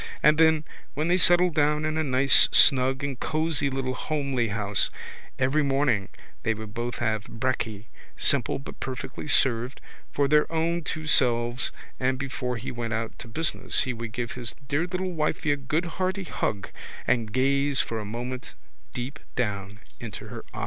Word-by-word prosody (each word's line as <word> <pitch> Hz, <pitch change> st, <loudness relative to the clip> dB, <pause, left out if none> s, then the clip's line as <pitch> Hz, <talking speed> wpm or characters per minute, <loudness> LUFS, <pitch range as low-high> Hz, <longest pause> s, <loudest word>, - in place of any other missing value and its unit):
and 150 Hz, +1 st, +5 dB
then, 160 Hz, -1 st, +5 dB, 0.3 s
when 155 Hz, +3 st, 0 dB
they 180 Hz, -, +5 dB
settled 175 Hz, -1 st, +5 dB
down 150 Hz, 0 st, +2 dB
in 155 Hz, 0 st, -1 dB
a 160 Hz, -, +1 dB
nice 135 Hz, -1 st, +5 dB
snug 130 Hz, +1 st, +5 dB
and 140 Hz, -3 st, -3 dB
cosy 155 Hz, -2 st, 0 dB
little 130 Hz, -1 st, -2 dB
homely 140 Hz, -4 st, -1 dB
house, 105 Hz, -2 st, +1 dB, 0.5 s
every 135 Hz, +4 st, +2 dB
morning 135 Hz, -8 st, +1 dB, 0.3 s
they 115 Hz, -, 0 dB
would 110 Hz, -1 st, -8 dB
both 120 Hz, +1 st, -3 dB
have 110 Hz, -2 st, -1 dB
brekky, 115 Hz, -3 st, -2 dB, 0.3 s
simple -, -, +1 dB
but 140 Hz, -, -10 dB
perfectly 130 Hz, +3 st, -5 dB
served, 125 Hz, -2 st, +2 dB, 0.3 s
for 140 Hz, -1 st, +2 dB
their 150 Hz, +2 st, +3 dB
own 165 Hz, +1 st, 0 dB
two 155 Hz, 0 st, -4 dB
selves 120 Hz, -4 st, +2 dB, 0.3 s
and 130 Hz, 0 st, +1 dB
before 130 Hz, -2 st, -3 dB
he 110 Hz, -, -5 dB
went 115 Hz, -2 st, -3 dB
out 115 Hz, 0 st, -3 dB
to -, -, -8 dB
business 155 Hz, +7 st, 0 dB
he 130 Hz, -, -2 dB
would 115 Hz, -1 st, -6 dB
give 120 Hz, 0 st, -3 dB
his 120 Hz, -4 st, -4 dB
dear 150 Hz, +6 st, 0 dB
little 185 Hz, 0 st, -2 dB
wifey 155 Hz, -2 st, 0 dB
a -, -, +3 dB
good 150 Hz, +5 st, -1 dB
hearty 185 Hz, +3 st, -2 dB
hug 105 Hz, -, -3 dB, 0.4 s
and 115 Hz, -3 st, +1 dB
gaze 140 Hz, +3 st, +2 dB
for 115 Hz, -, -1 dB
a -, -, -4 dB
moment 120 Hz, +4 st, -6 dB, 0.4 s
deep 130 Hz, +5 st, -4 dB, 0.2 s
down 100 Hz, -3 st, -2 dB, 0.2 s
into 115 Hz, -3 st, -7 dB
her -, -, -7 dB
eyes. -, -, -7 dB
130 Hz, 170 wpm, -26 LUFS, 115-150 Hz, 0.5 s, and